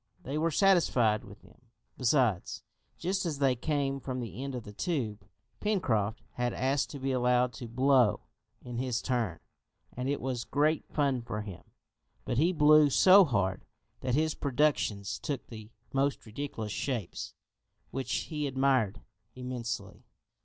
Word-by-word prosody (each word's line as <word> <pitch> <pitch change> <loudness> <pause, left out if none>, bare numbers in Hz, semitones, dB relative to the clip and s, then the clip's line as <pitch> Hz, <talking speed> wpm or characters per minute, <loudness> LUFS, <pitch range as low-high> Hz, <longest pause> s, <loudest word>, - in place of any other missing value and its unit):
They 135 - -4
were 160 +2 +1
satisfied 150 - +3
with 100 +1 -14
them, 110 +5 -20 0.3
besides, 125 - +1 0.3
just 190 +3 -1
as 160 -5 -2
they 135 -2 +3
came 140 +1 -1
from 130 -1 -4
the 115 0 -6
end 135 -1 -4
of 120 - -5
the 105 - -10
tube. 115 - -2 0.4
Pencroft 115 - 0
had 120 +1 -1
asked 135 +2 0
to 140 - -7
be 135 0 -1
allowed 125 -1 +2
to 115 +3 -7
"blow" 130 -1 +3 0.4
in 120 -1 -5
his 125 -2 -1
turn, 115 -10 -1 0.6
and 125 +2 -2
it 145 - 0
was 125 -2 -3
great 150 +4 +1
fun 140 -4 0
for 105 -2 -4
him; 100 -5 -8 0.6
but 120 - 0
he 165 +4 +4
blew 150 -2 +6
so 190 +7 +7
hard 100 - 0 0.4
that 125 -1 -1
his 155 +1 +2
productions 135 -8 0
took 140 -4 -4
the 110 -2 -10 0.2
most 135 0 0
ridiculous 110 -2 -5
shapes, 115 -6 -4 0.6
which 135 -2 -4
he 150 -3 -2
admired 130 -6 +1 0.3
immensely. 120 -5 -5
130 Hz, 150 wpm, -30 LUFS, 115-145 Hz, 0.6 s, so